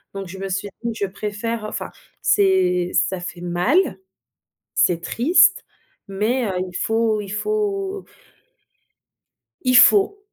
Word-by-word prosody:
Donc 195 -1 -5
je 190 +2 -9
me 195 0 -4
suis 195 +2 -3
dit: 235 -1 -3
«Je 205 - -1
préfère, 210 +3 -4
heu», - - -3
enfin - - -6 0.3
c'est 180 -2 +2
ça 190 - +1
fait 175 0 -8
mal, 185 - +1 0.8
c'est 170 -2 +2
triste 345 - +3 0.5
mais, 225 +6 0
heu, 195 - -2
il 180 - -11
faut 225 +1 0
il 205 - -8
faut 395 - -2 1.6
il 255 -1 +4
faut! 405 +4 +5
210 Hz, 135 wpm, -21 LUFS, 190-260 Hz, 1.6 s, faut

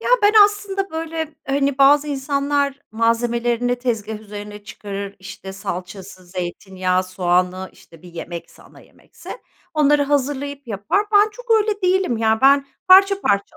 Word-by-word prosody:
Ya - - -4
ben 410 +1 +5
aslında 400 -1 -2
böyle 320 -1 -5
hani, 275 0 0
bazı 290 +2 +5
insanlar 280 0 -1
malzemelerini 235 +2 0
tezgâh 220 -4 -3
üzerine 210 -1 -9
çıkarır, 200 -1 -7
işte 190 0 -9
salçası, 185 0 -8
zeytinyağı, 185 +1 -2
soğanı, 185 0 -1
işte 165 -1 -19
bir 175 -1 -14
yemekse, 170 0 -9
ana - - -18
yemekse - - -16 0.4
onları 295 -1 +3
hazırlayıp 285 0 -2
yapar. 220 - -1
Ben 415 +1 +5
çok - - -13
öyle 430 -2 +2
değilim 370 -8 +1
ya, 220 0 +1
ben 275 +1 +5 0.2
parça 390 +1 +6
parça 200 - -1
245 Hz, 135 wpm, -20 LUFS, 200-295 Hz, 0.4 s, parça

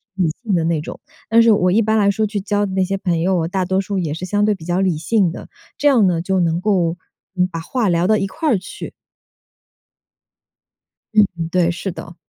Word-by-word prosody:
理 180 -4 +1
性 215 -4 -1
的 170 -3 +2
那 165 -1 0
种。 155 - -8 0.3
但 230 +1 +5
是 230 0 +5
我 185 -4 +3
一 215 +5 +3
般 220 0 +1
来 200 -1 +3
说 215 +2 0
去 205 0 -3
交 205 +1 0
的 190 - -5
那 190 0 +1
些 195 +1 -2
朋 175 -4 -1
友， 175 -2 +1
大 185 +1 -1
多 190 +1 0
数 200 0 -4
也 165 -5 -2
是 165 +4 -5
相 205 +3 +1
对 210 - +2
比 190 -5 -10
较 175 +1 0
理 185 -5 +1
性 180 +3 +1
的， - - -9 0.3
这 290 - +1
样 245 -7 +5
呢， 175 -3 +1
就 190 +2 0
能 170 0 0
够， 180 -5 +1 0.4
嗯 180 0 +2
把 165 - -4
话 225 +4 -1
聊 170 0 +1
到 215 +3 +3
一 195 -1 -1
块 315 +10 -2
儿 225 - +3
去。 185 - -9 2.2
嗯， 210 -1 +6 0.3
对， 175 -2 +2
是 175 +3 -3
的。 170 0 -10
190 Hz, 245 characters per minute, -19 LUFS, 175-205 Hz, 2.2 s, 嗯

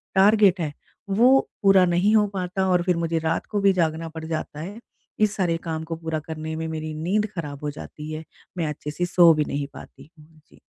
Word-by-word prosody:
Target 200 -1 +5
है 150 -3 -2 0.4
वो 245 +7 +5 0.2
पूरा 195 -2 +6
नहीं 180 +5 +2
हो 210 -1 +4
पाता 185 +1 -1
और 180 -1 +3
फिर 180 -1 +1
मुझे 165 -1 0
रात 160 +1 -1
को 205 - 0
भी 195 -1 +5
जागना 165 -2 -1
पड़ 160 0 -8
जाता 160 -2 -4
है, 195 +8 -7 0.4
इस 215 -1 +2
सारे 175 -4 0
काम 160 -1 -3
को 165 +1 -5
पूरा 160 -1 -3
करने 160 0 -5
में 160 0 -3
मेरी 155 -1 -4
नींद 205 +6 +1
खराब 150 -4 -6
हो 150 - -2
जाती 150 +1 -9
है, 155 +1 -5 0.3
मैं 165 -3 0
अच्छे 150 0 -5
से 175 +4 -2
सो 175 -1 +6
भी 150 -1 0
नहीं 140 0 -3
पाती - - -13
हूँ। 155 +1 -19
जी। - - -21
165 Hz, 220 wpm, -24 LUFS, 155-190 Hz, 0.4 s, पूरा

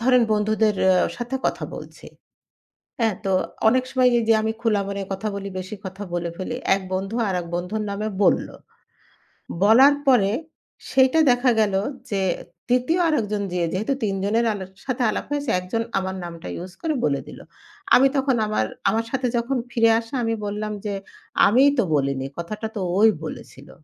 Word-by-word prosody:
ধরেন 250 0 +4
বন্ধুদের 215 0 +2 0.2
আ - - +4 0.2
সাথে 245 +2 -3
কথা - - -2
বলছি। - - -10 0.9
হ্যাঁ 225 -3 +2
তো, 195 - 0 0.4
অনেক 255 +2 +3
সময় 255 -1 +4
এইযে 225 0 +3
আমি 220 0 0
খোলা 220 -3 +2
মনে 200 0 -3
কথা 205 +3 -3
বলি, 200 0 -5
বেশি 185 +3 -6
কথা 190 +2 -7
বলে 170 -1 -2
ফেলি। 240 +6 -4 0.2
এক 195 - -3
বন্ধু 195 +4 -3
আরেক 180 -2 -2
বন্ধুর 180 +5 -2
নামে 210 +2 -2
বলল। - - +3 1.2
বলার 260 +7 +7
পরে 210 -7 +5 0.6
সেইটা 265 +4 +4
দেখা 245 +1 +3
গেল 205 -3 +2 0.4
যে 195 -1 0 0.5
৩য় 255 +8 +2
আরেকজন 210 -9 0
যে 180 - -1
যেহেতু 220 +9 0
৩ 195 -2 0
জনের 225 +4 +1
আলক 190 -2 -7 0.2
সাথে 255 -1 -1
আলাপ - - -2
হয়েছে 290 -3 -2
একজন 185 +6 -2 0.2
আমার 190 0 -4
নামটা 170 -1 -8 0.2
use 185 0 -11
করে 315 -2 -1
বলে 140 -2 0
দিল। - - -10 0.6
আমি 270 - +6
তখন 270 -2 +2
আমার 160 - 0 0.2
আমার 225 +1 0
সাথে 260 -1 0
যখন 250 +3 -1
ফিরে 230 -1 +4
আসে 230 +2 -11
আমি 225 0 0
বললাম 210 +1 -3
যে, 205 - -2 0.5
"আমিই 265 +7 +5
তো - - +4
বলিনি। 135 -1 0
কথাটা 210 +6 -4
তো 205 - -3 0.2
ওই 220 +1 +7 0.2
বলেছিল। 140 -2 -9
215 Hz, 170 wpm, -23 LUFS, 195-245 Hz, 1.2 s, বলার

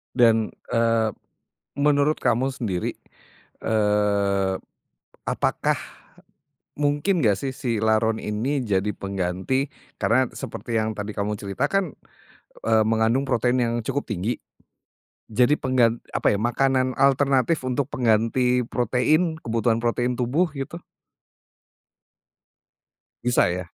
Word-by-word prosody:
Dan, 115 -3 +4 0.2
eee, 115 -1 +2 0.7
menurut 145 +1 +2
kamu 130 +2 +1
sendiri, 95 -9 -2 0.7
eee, 100 -3 +1 0.7
apakah, - - 0 1.0
mungkin 145 +5 +1
gak 105 -2 +4
sih 135 -1 -3
si 120 -4 -2
laron 110 0 +2
ini 125 +6 -1
jadi 100 -1 0
pengganti 100 +8 -2 0.3
karena 130 +2 +3
seperti 115 -1 -5
yang 110 0 -1
tadi 105 0 -4
kamu 105 +1 -1
ceritakan, 150 - -1 0.8
eee, 110 -1 +4
mengandung 115 +4 +2
protein 125 +2 +1
yang 115 0 0
cukup 140 +5 -2
tinggi, 105 +4 -1 0.9
jadi 125 +7 +3
penggan 120 -3 +2
apa - - +2
ya 100 - 0
makanan 130 +2 +1
alternatif 140 +2 +3
untuk 130 +2 -1
pengganti 125 +1 +2
protein 155 +7 +1
kebutuhan 115 0 0
protein 120 +1 +1
tubuh 145 +8 +1
gitu? 140 +4 -5 2.5
Bisa 125 0 +3
ya? 90 +1 -2
120 Hz, 105 wpm, -24 LUFS, 110-135 Hz, 2.5 s, Dan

